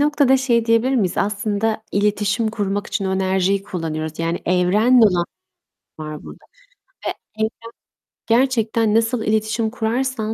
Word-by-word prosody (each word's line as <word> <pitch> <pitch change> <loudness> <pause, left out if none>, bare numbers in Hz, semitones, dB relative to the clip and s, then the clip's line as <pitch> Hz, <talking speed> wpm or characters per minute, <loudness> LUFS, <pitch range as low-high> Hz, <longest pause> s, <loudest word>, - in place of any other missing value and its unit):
noktada 290 -2 +3
şey 240 -3 +1
diyebilir 230 +3 +2
miyiz? 200 -8 +1
Aslında 210 +2 -1
iletişim 210 +2 +1
kurmak 205 -1 -2
için 200 - -3
o 190 0 0
enerjiyi 190 +1 +1
kullanıyoruz. 160 -4 -5
Yani, 165 +1 -1
evrenle 210 +7 +4
olan 175 -3 +1 0.8
var 155 -1 -7
burada - - -12 0.6
ve - - +1 0.3
evren 220 0 +1 0.8
gerçekten 230 -3 +2
nasıl 225 +1 +1
iletişim 220 +1 0
kurarsan 230 0 -2
215 Hz, 130 wpm, -20 LUFS, 190-230 Hz, 0.8 s, evrenle